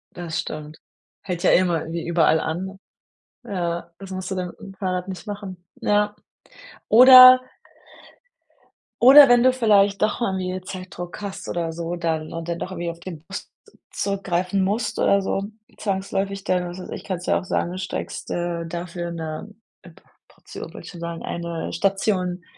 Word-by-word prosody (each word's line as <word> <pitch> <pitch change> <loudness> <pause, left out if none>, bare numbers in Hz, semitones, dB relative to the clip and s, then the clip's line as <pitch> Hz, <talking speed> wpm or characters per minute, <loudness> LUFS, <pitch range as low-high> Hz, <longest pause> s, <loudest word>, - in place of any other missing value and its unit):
Das 170 -2 -4
stimmt. 155 0 -6 0.5
Hält 180 -3 -4
ja - - +5
eh - - +6
immer 175 -3 +1
irgendwie 165 +1 -5
überall 165 -2 +3
an. 185 +5 -4 0.7
Ja, 175 -5 -3
das 195 0 -10
musst 185 0 -5
du - - -1
dann 180 -2 -4
im 195 - -10
Fahrrad 185 -1 -3
nicht 190 +3 -8
machen. 195 -4 -7 0.2
Ja, 210 0 +1 0.7
oder 255 +2 +10 1.6
oder 275 +4 +10
wenn 245 0 +6
du 255 - +6
vielleicht 205 -5 +3
doch 215 +3 0
mal 195 -5 0
wieder 185 0 -3
Zeitdruck 185 0 -8
hast 200 -2 -6
oder 170 -1 -2
so, 170 +1 -4
dann 160 -2 -2
und 165 0 -6
dann 170 0 -3
doch 185 - -5
irgendwie 175 -2 -4
auf 170 0 -8
den 170 -4 -9
Bus 195 +4 -8 0.4
zurückgreifen 195 -1 -1
musst 210 +5 -1
oder 200 0 +3
so 195 0 -2 0.3
zwangsläufig 195 0 -2
dann, 180 -2 0
was 175 +2 -8
weiß 185 - -9
ich - - -6
kannst 180 -2 -5
ja - - +3
auch - - -9
sagen, 180 0 -2
steigst, 185 0 -5
äh, 175 -1 -2
dafür 170 0 -5
'ne 160 +4 -6 0.3
P - - -13 0.4
Portion - - -11
wollte - - -10
ich - - -9
schon 175 - -11
sagen, 170 0 -5
eine 170 -1 -4
Station, 185 -1 0
185 Hz, 170 wpm, -23 LUFS, 170-200 Hz, 1.6 s, oder